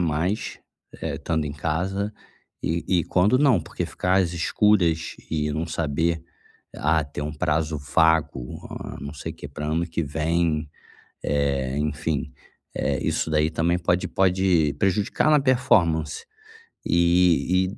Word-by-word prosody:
mais, 85 +5 -1 0.4
eh, - - -3
estando 80 -2 -1
em 70 - -4
casa 95 +8 -2 0.5
e 85 +1 -1 0.2
e - - -4
quando 100 +10 +3
não, 130 - +4
porque - - -4
ficar 90 +1 -1
as 85 -1 -2
escuras 85 -1 +2
e 75 -2 0
não 80 +3 -2
saber: 80 +1 -1 0.5
"Ah, 80 +1 +2
ter 70 +1 -6
um 75 0 -3
prazo 80 -1 0
vago, 75 -3 +1
hã, - - -7
não 70 +1 -6
sei - - -6
quê - - -9
pra 75 - -6
ano 80 +2 0
que 85 0 -2
vem." 80 0 0 0.5
Eh, 70 -2 0
enfim, 75 0 -2 0.4
eh, 70 0 -1
isso - - 0
daí 75 0 +2
também 85 +2 +1
pode 90 +1 +1
pode 90 -5 +2
prejudicar 105 +9 +1
na 150 -1 +5
performance. 85 - +2 0.6
E 90 +1 +3
e - - -11
80 Hz, 140 wpm, -24 LUFS, 75-90 Hz, 0.6 s, na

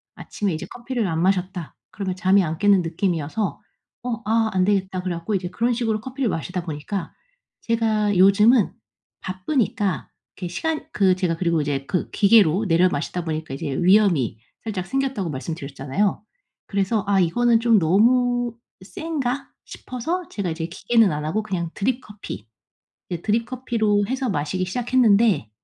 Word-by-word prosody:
아침에 200 -5 -3
이제 155 - -4
커피를 240 -3 -3
안 165 -1 -1
마셨다. 185 -2 -1 0.2
그러면 190 -3 -3
잠이 190 +1 +3
안 160 -1 -3
깨는 200 -2 +5
느낌이어서 170 +1 -2 0.4
'어 240 -2 -3
아 225 0 +2
안 185 -1 +2
되겠다.' 190 -2 0
그래 180 -2 -2
갖고 170 +6 -4
인제 180 -2 -2
그런 235 +4 0
식으로 225 -3 0
커피를 260 0 -2
마시다 180 +2 -3
보니까 165 +4 -5 0.5
제가 220 -3 +1
요즘은 205 +4 +5 0.5
바쁘니까 195 - -1 0.3
그 180 - -4
시간 310 - -2
그 190 -2 +3
제가 180 -3 0
그리고 170 -3 +1
이제 140 -2 -2
그 180 - -1
기계로 200 -2 +4
내려 175 +2 +4
마시다 170 +3 -3
보니까 155 -3 -4
이제 140 0 -4
위염이 175 - +3 0.2
살짝 200 -5 -3
생겼다고 265 -10 -1
말씀드렸잖아요. 140 +6 -2 0.5
그래서 200 +1 0
'아 200 -1 +3
이거는 230 +7 +3
좀 230 -3 +5
너무 240 +7 +3 0.3
센가?' 280 - -3 0.2
싶어서 330 +9 -4
제가 200 -4 -3
이제 165 0 -3
기계는 210 +4 +2
안 150 0 -3
하고 190 +8 0
그냥 180 -5 -3
드립 250 +5 0
커피, 200 - -9 0.6
이제 175 -1 -4
드립 225 +2 +1
커피로 225 -5 0
해서 260 -1 -1
마시기 185 +2 -1
시작했는데 230 - +3
200 Hz, 350 characters per minute, -23 LUFS, 175-230 Hz, 0.6 s, 깨는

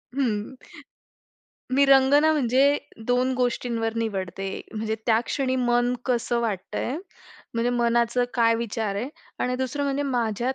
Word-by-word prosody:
हं. 230 -3 -1 1.2
मी 280 +1 +5
रंगना, 275 +3 +5
म्हणजे 275 +1 +3 0.3
दोन 250 +1 +2
गोष्टींवर 235 -2 -1
निवडते, 195 -3 -3 0.3
म्हणजे 220 0 -2
त्या 225 0 +4
क्षणी 260 -2 0
मन 245 0 +2
कसं 240 -1 0
वाटतंय, 225 +5 -2 0.6
म्हणजे 235 +1 +1
मनाचं 235 0 +2
काय 230 -1 +4
विचार 225 -3 -2
आहे. 230 +6 -3 0.3
आणि 250 0 0
दुसरं 260 +2 -2
म्हणजे 280 +1 0
माझ्यात 245 -1 -1
245 Hz, 125 wpm, -25 LUFS, 230-260 Hz, 1.2 s, मी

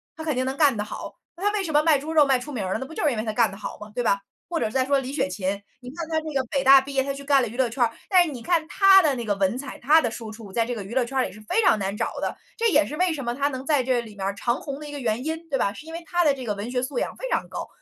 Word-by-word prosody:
他 320 - -7
肯 310 -4 -1
定 255 - 0
能 265 +1 -3
干 290 -5 +4
得 210 - -2
好。 210 - -7 0.2
那 365 - -8
他 410 - +3
为 405 -2 0
什 320 - -3
么 295 +1 +4
卖 310 -3 +4
猪 305 +3 -6
肉 300 -2 +6
卖 265 -2 +3
出 295 +4 -8
名 225 -8 -3
儿 185 - -1
了， - - -1
那 265 - -4
不 320 - -11
就 - - -2
是 295 - +4
因 235 - -3
为 215 - -1
他 220 - -2
干 225 -3 +3
得 - - -9
好 205 - -6
吗， 210 0 -10
对 245 +1 -1
吧？ 200 -3 +2 0.3
或 345 - -1
者 - - +1
再 260 +3 +1
说 280 0 +3
李 265 0 -5
雪 285 - 0
琴， 190 +2 -3 0.2
你 250 - -9
看 330 +2 -6
她 320 - -3
这 315 -1 -6
个 270 - +2
北 275 -1 0
大 270 +1 +9
毕 275 +1 -7
业， 265 -1 +2
她 275 0 -3
去 280 - -8
干 280 -1 +3
了 245 - 0
娱 240 - -10
乐 260 -2 +2
圈 245 +2 0
儿， 230 - +2 0.2
但 370 -2 +6
是 320 - -4
你 245 - -7
看 335 +2 +1
她 385 +4 +7
的 300 -5 +2
那 240 -2 -4
个 205 -2 0
文 195 +4 +1
采， 275 +1 -7
她 305 +6 +5
的 240 - 0
输 225 -1 -7
出 215 -3 -11
在 230 - +1
这 245 - -3
个 220 - -5
娱 230 +6 -7
乐 260 - +3
圈 265 +2 -1
里 - - -11
是 215 - -13
非 455 - +3
常 360 - +5
难 200 +1 -3
找 - - -2
的， - - -1 0.2
这 460 0 +2
也 300 -5 +4
是 300 - -6
为 365 +2 +2
什 285 -5 -4
么 240 0 -2
她 285 +1 +1
能 260 -1 -6
在 290 -3 +2
这 250 -1 +1
里 220 -3 -8
面 195 -1 -4
儿 195 - -1
长 235 +4 -1
红 280 -1 -6
的 300 - -8
一 - - -8
个 285 - -5
原 235 +2 -1
因， 325 +1 -4
对 270 - 0
吧？ 200 - +1
是 295 - -11
因 325 - -9
为 335 +1 -6
她 350 0 +2
的 295 -3 +4
这 260 -2 -7
个 210 - -1
文 205 +4 -5
学 250 -1 0
素 260 0 -4
养 - - -1
非 - - -5
常 - - -1
高。 - - -5
265 Hz, 405 characters per minute, -24 LUFS, 230-300 Hz, 0.3 s, 大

